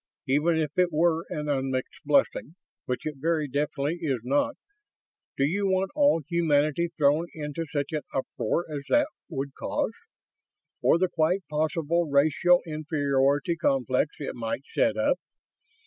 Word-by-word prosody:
Even 150 Hz, +5 st, +2 dB
if 155 Hz, -3 st, 0 dB
it 180 Hz, -1 st, +3 dB
were 165 Hz, +1 st, +2 dB
an 150 Hz, 0 st, -4 dB
unmixed 135 Hz, -2 st, -2 dB
blessing 145 Hz, +2 st, +1 dB, 0.3 s
which 125 Hz, -, -2 dB
it 150 Hz, -2 st, -4 dB
very 155 Hz, +1 st, 0 dB
definitely 145 Hz, +3 st, -1 dB
is 140 Hz, -6 st, 0 dB
not 145 Hz, -, +1 dB, 0.8 s
do 135 Hz, -, +2 dB
you 195 Hz, +7 st, 0 dB
want 190 Hz, 0 st, +1 dB
all 285 Hz, -, +3 dB
humanity 160 Hz, -1 st, +2 dB
thrown 150 Hz, +3 st, +3 dB
into 155 Hz, +1 st, -4 dB
such 145 Hz, -2 st, -2 dB
an 155 Hz, -1 st, -1 dB
uproar 150 Hz, +5 st, -1 dB
as 150 Hz, -3 st, -4 dB
that 295 Hz, 0 st, +3 dB, 0.2 s
would 140 Hz, -3 st, -4 dB
cause? -, -, -2 dB, 0.9 s
Or -, -, +4 dB
the 185 Hz, +2 st, +2 dB
quite 175 Hz, +3 st, 0 dB
possible 160 Hz, +2 st, 0 dB
racial 155 Hz, +5 st, +4 dB
inferiority 145 Hz, -1 st, +1 dB
complex 135 Hz, -2 st, +1 dB
it 145 Hz, -, -4 dB
might 115 Hz, +3 st, -4 dB
set -, -, +2 dB
up? -, -, +2 dB
150 Hz, 145 wpm, -27 LUFS, 140-170 Hz, 0.9 s, Or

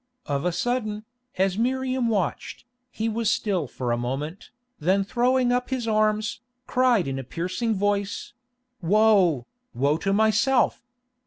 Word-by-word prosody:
Of 140 Hz, +2 st, -2 dB
a 180 Hz, -, +2 dB
sudden, 215 Hz, +1 st, -2 dB, 0.3 s
as 190 Hz, +1 st, +1 dB
Miriam 255 Hz, 0 st, 0 dB
watched, 205 Hz, -1 st, -2 dB, 0.2 s
he 220 Hz, -, -3 dB
was 225 Hz, -1 st, 0 dB
still 190 Hz, -11 st, 0 dB
for 125 Hz, 0 st, -3 dB
a 120 Hz, -, +1 dB
moment, 140 Hz, +9 st, -4 dB, 0.3 s
then 190 Hz, +5 st, +2 dB
throwing 245 Hz, +4 st, +2 dB
up 250 Hz, 0 st, 0 dB
his 255 Hz, -3 st, -2 dB
arms, 215 Hz, 0 st, +1 dB, 0.3 s
cried 250 Hz, -, +2 dB
in 135 Hz, 0 st, -3 dB
a -, -, -5 dB
piercing 185 Hz, -, -2 dB
voice, 200 Hz, 0 st, -1 dB, 0.5 s
"Woe, 185 Hz, -, +4 dB, 0.3 s
woe 140 Hz, +4 st, +2 dB
to 195 Hz, +4 st, -1 dB
myself!" 220 Hz, +5 st, +2 dB
210 Hz, 140 wpm, -25 LUFS, 175-235 Hz, 0.5 s, Woe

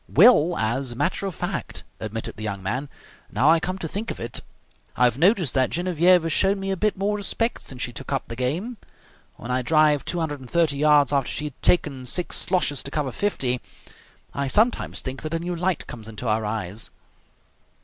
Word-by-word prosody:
"Well, 175 Hz, -, +6 dB
as 120 Hz, +4 st, -1 dB
a -, -, -11 dB
matter 185 Hz, +9 st, -1 dB
of 185 Hz, -, -5 dB
fact," 175 Hz, -3 st, -4 dB, 0.2 s
admitted 110 Hz, +1 st, -4 dB
the -, -, -10 dB
young 100 Hz, -3 st, -4 dB
man, 125 Hz, +9 st, -2 dB, 0.4 s
"now 150 Hz, +4 st, +4 dB
I 165 Hz, -, +5 dB
come 185 Hz, +3 st, -3 dB
to 170 Hz, -, -4 dB
think 205 Hz, +8 st, -4 dB
of -, -, -5 dB
it 115 Hz, -, -3 dB, 0.6 s
I -, -, +3 dB
have 125 Hz, +1 st, +3 dB
noticed 180 Hz, -, +3 dB
that 130 Hz, -2 st, +2 dB
Genevieve 175 Hz, 0 st, +3 dB
has 165 Hz, -2 st, 0 dB
shown 195 Hz, +3 st, +3 dB
me 195 Hz, 0 st, -2 dB
a -, -, +1 dB
bit 210 Hz, +2 st, 0 dB
more 200 Hz, +2 st, 0 dB
respect 230 Hz, +3 st, -1 dB
since 130 Hz, -2 st, -5 dB
she 120 Hz, -, -4 dB
took -, -, -7 dB
up 135 Hz, -, 0 dB
the 115 Hz, -, -6 dB
game. 165 Hz, -, -2 dB, 0.6 s
When 120 Hz, -, -7 dB
I 130 Hz, +1 st, +1 dB
drive 150 Hz, +1 st, +3 dB
230 160 Hz, -1 st, 0 dB
yards 145 Hz, -1 st, +4 dB
after 140 Hz, -3 st, +1 dB
she -, -, -2 dB
had 145 Hz, -4 st, -8 dB
taken 135 Hz, -7 st, +1 dB
six 180 Hz, +7 st, -1 dB
sloshes 175 Hz, -6 st, +1 dB
to -, -, -6 dB
cover 145 Hz, -2 st, -2 dB
fifty, 125 Hz, -9 st, -1 dB, 0.7 s
I 140 Hz, 0 st, -1 dB
sometimes 220 Hz, -, +1 dB
think 130 Hz, 0 st, -5 dB
that 155 Hz, +1 st, -3 dB
a -, -, 0 dB
new 175 Hz, +1 st, -3 dB
light 175 Hz, 0 st, -1 dB
comes 110 Hz, -3 st, -9 dB
into 110 Hz, +2 st, -7 dB
her 110 Hz, 0 st, +1 dB
eyes." 105 Hz, -1 st, -3 dB
150 Hz, 200 wpm, -24 LUFS, 125-180 Hz, 0.7 s, Well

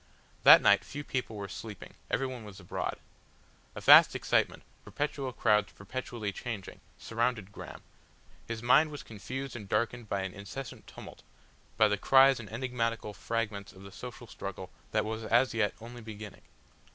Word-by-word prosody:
That -, -, +9 dB
night -, -, +5 dB
few 145 Hz, +1 st, -7 dB
people 125 Hz, -5 st, -3 dB
were 100 Hz, -1 st, -5 dB
sleeping, 105 Hz, -1 st, -9 dB, 0.2 s
everyone 130 Hz, -3 st, -2 dB
was 105 Hz, -2 st, -11 dB
abroad. 90 Hz, -, -3 dB, 0.8 s
A -, -, -6 dB
vast -, -, +8 dB
excitement, -, -, +1 dB, 0.2 s
perpetual 145 Hz, -2 st, -3 dB
crowds 105 Hz, -3 st, +2 dB
perpetually 110 Hz, 0 st, -5 dB
changing, 110 Hz, -3 st, -6 dB, 0.2 s
surrounded 115 Hz, -3 st, -2 dB
Graham; -, -, -10 dB, 0.6 s
his 115 Hz, 0 st, -5 dB
mind 150 Hz, +6 st, +5 dB
was 145 Hz, -1 st, -8 dB
confused 130 Hz, +5 st, -6 dB
and 105 Hz, -5 st, -8 dB
darkened 115 Hz, +1 st, -1 dB
by 100 Hz, -, 0 dB
an 95 Hz, -1 st, -4 dB
incessant 105 Hz, +6 st, -8 dB
tumult, -, -, -11 dB, 0.6 s
by 110 Hz, -1 st, +6 dB
the 105 Hz, -1 st, 0 dB
cries 135 Hz, +1 st, +6 dB
and 110 Hz, -, -9 dB
enigmatical 115 Hz, -3 st, -2 dB
fragments 105 Hz, -2 st, -3 dB
of 95 Hz, 0 st, -14 dB
the 100 Hz, -, -11 dB
social 125 Hz, +3 st, -9 dB
struggle 95 Hz, -4 st, -7 dB, 0.2 s
that 110 Hz, -1 st, 0 dB
was 110 Hz, +1 st, -4 dB
as 120 Hz, +4 st, +3 dB
yet 110 Hz, -3 st, +1 dB
only 120 Hz, +2 st, -10 dB
beginning. 110 Hz, -2 st, -9 dB
115 Hz, 155 wpm, -30 LUFS, 105-125 Hz, 0.8 s, That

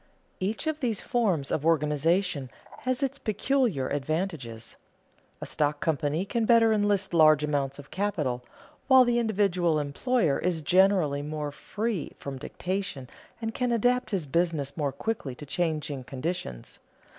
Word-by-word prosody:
Each 210 Hz, +9 st, -2 dB
of 315 Hz, -1 st, -1 dB
these 230 Hz, -6 st, 0 dB
forms 190 Hz, -, 0 dB
of 145 Hz, -, 0 dB
organization 155 Hz, -1 st, +1 dB, 0.3 s
has 255 Hz, +1 st, -1 dB
its 275 Hz, +1 st, -2 dB
peculiar 215 Hz, -, 0 dB
advantages. 145 Hz, -6 st, -3 dB, 0.7 s
A -, -, -4 dB
stock 150 Hz, 0 st, 0 dB
company 155 Hz, +2 st, 0 dB
can 230 Hz, +2 st, 0 dB
better 225 Hz, -1 st, +5 dB
enlist 205 Hz, -3 st, +1 dB
large 155 Hz, -2 st, +6 dB
amounts 140 Hz, -2 st, -1 dB
of 145 Hz, -1 st, -12 dB
capital, 155 Hz, -11 st, -1 dB, 0.4 s
while 260 Hz, -1 st, +7 dB
the 240 Hz, 0 st, +2 dB
individual 190 Hz, -7 st, +1 dB
employer 150 Hz, -, +1 dB
is 170 Hz, -3 st, -1 dB
generally 180 Hz, -4 st, +3 dB
more 150 Hz, 0 st, -4 dB
free 210 Hz, +4 st, -3 dB
from 135 Hz, -2 st, -6 dB
dictation 180 Hz, -7 st, -4 dB, 0.3 s
and 225 Hz, -1 st, -3 dB
can 250 Hz, +1 st, 0 dB
adapt 245 Hz, +1 st, +2 dB
his 190 Hz, -7 st, -1 dB
business 160 Hz, -2 st, 0 dB
more 145 Hz, -4 st, -1 dB
quickly 140 Hz, -, -3 dB
to 145 Hz, -, -9 dB
changing 155 Hz, -4 st, -2 dB
conditions. 130 Hz, -, -5 dB
170 Hz, 140 wpm, -27 LUFS, 145-215 Hz, 0.7 s, while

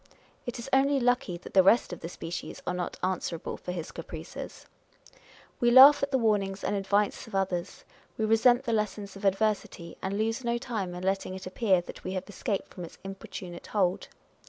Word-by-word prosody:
It 245 Hz, -, -3 dB
is 235 Hz, +2 st, -7 dB
only 275 Hz, +1 st, +4 dB
lucky 245 Hz, -7 st, +1 dB
that 175 Hz, -, -12 dB
the 190 Hz, -, +7 dB
rest 195 Hz, +1 st, +4 dB
of -, -, -7 dB
the 165 Hz, -, -6 dB
species 175 Hz, 0 st, -6 dB
are 180 Hz, -, -1 dB
not 180 Hz, -1 st, -4 dB
answerable 180 Hz, -2 st, -2 dB
for 180 Hz, -, -6 dB
his 175 Hz, -2 st, -5 dB
caprices! -, -, -8 dB, 0.9 s
We 240 Hz, -, +4 dB
laugh 270 Hz, +4 st, +9 dB
at 280 Hz, -, 0 dB
the 270 Hz, -, +2 dB
warnings 205 Hz, -4 st, 0 dB
and 205 Hz, -, 0 dB
advice 200 Hz, +3 st, 0 dB
of 220 Hz, -, -8 dB
others; 185 Hz, -2 st, -2 dB, 0.3 s
we 220 Hz, -, +1 dB
resent 240 Hz, +3 st, +4 dB
the 230 Hz, -, -1 dB
lessons 210 Hz, -2 st, -2 dB
of 195 Hz, +1 st, -7 dB
adversity, 195 Hz, -4 st, 0 dB
and 195 Hz, +1 st, -2 dB
lose 225 Hz, +3 st, -1 dB
no 235 Hz, 0 st, 0 dB
time 215 Hz, -8 st, -4 dB
in 180 Hz, -, -6 dB
letting 190 Hz, 0 st, -1 dB
it 190 Hz, -, -8 dB
appear 185 Hz, 0 st, +2 dB
that -, -, -11 dB
we 185 Hz, -, -4 dB
have 185 Hz, -1 st, -4 dB
escaped 205 Hz, 0 st, -3 dB
from 180 Hz, -, -7 dB
its 170 Hz, -, -10 dB
importunate 190 Hz, -2 st, -8 dB
hold. 190 Hz, -3 st, 0 dB
195 Hz, 195 wpm, -28 LUFS, 185-230 Hz, 0.9 s, laugh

